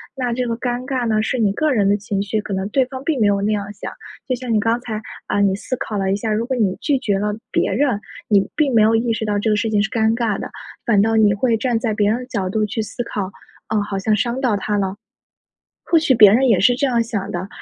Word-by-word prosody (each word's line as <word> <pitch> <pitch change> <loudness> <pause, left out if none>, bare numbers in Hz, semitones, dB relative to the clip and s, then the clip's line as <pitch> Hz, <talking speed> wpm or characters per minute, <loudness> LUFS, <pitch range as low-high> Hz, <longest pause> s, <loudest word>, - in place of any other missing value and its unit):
那 250 -3 -2
这 250 +1 -1
个 230 - -1
尴 245 +1 -3
尬 255 -3 -1
呢， 215 -1 +1
是 255 +3 -1
你 210 -3 +3
个 310 +7 +1
人 205 -5 +2
的 205 - +3
情 200 -1 -3
绪， 205 +2 -1
可 205 -1 -5
能 190 +1 -2
对 265 +4 +2
方 260 +1 -8
并 290 -2 0
没 215 - +3
有 200 -1 +2
那 205 +2 0
样 205 -1 -1
想。 - - -7 0.4
就 255 - 0
像 245 -1 -3
你 215 - +3
刚 225 +3 +1
才， 220 -3 -5 0.2
啊， 205 - 0
你 195 -1 +3
思 240 +5 -4
考 215 - -4
了 190 -1 0
一 - - +2
下， 215 +2 -2
如 215 +2 0
果 260 +1 -2
你 205 -6 +1
拒 285 -3 +1
绝 205 -6 0
了 210 +1 -1 0.2
别 - - +1
人， 265 -7 +1 0.3
你 200 -2 +3
并 290 -5 +1
没 220 - +6
有 220 +1 +4
意 230 +1 +1
识 225 -1 -2
到 205 -1 0
这 220 - 0
个 210 - +3
事 220 +1 -1
情 210 -1 +2
是 215 - -1
尴 220 0 +2
尬 230 -4 0
的， - - -6 0.3
反 210 -4 +4
倒 225 +2 +2
你 215 -2 +4
会 225 +3 +1
站 235 0 0
在 225 -2 -1
别 205 -1 +2
人 230 - 0
的 250 - -7
角 200 -7 -2
度 215 +3 0
去 210 +1 -3
思 225 +3 -5
考， 200 -4 -4 0.4
啊， 215 -1 +1
好 205 -1 -3
像 210 +2 +1
伤 235 +4 -1
到 245 -6 +2
他 205 +1 -1
了， 195 -1 -1 0.9
或 335 - +3
许 310 -4 +2
别 210 -3 +8
人 260 +4 +4
也 210 -6 +4
是 225 +7 +5
这 280 - 0
样 240 -3 +2
想 220 -4 -4
的， 180 +2 -4
220 Hz, 305 characters per minute, -20 LUFS, 205-245 Hz, 0.9 s, 别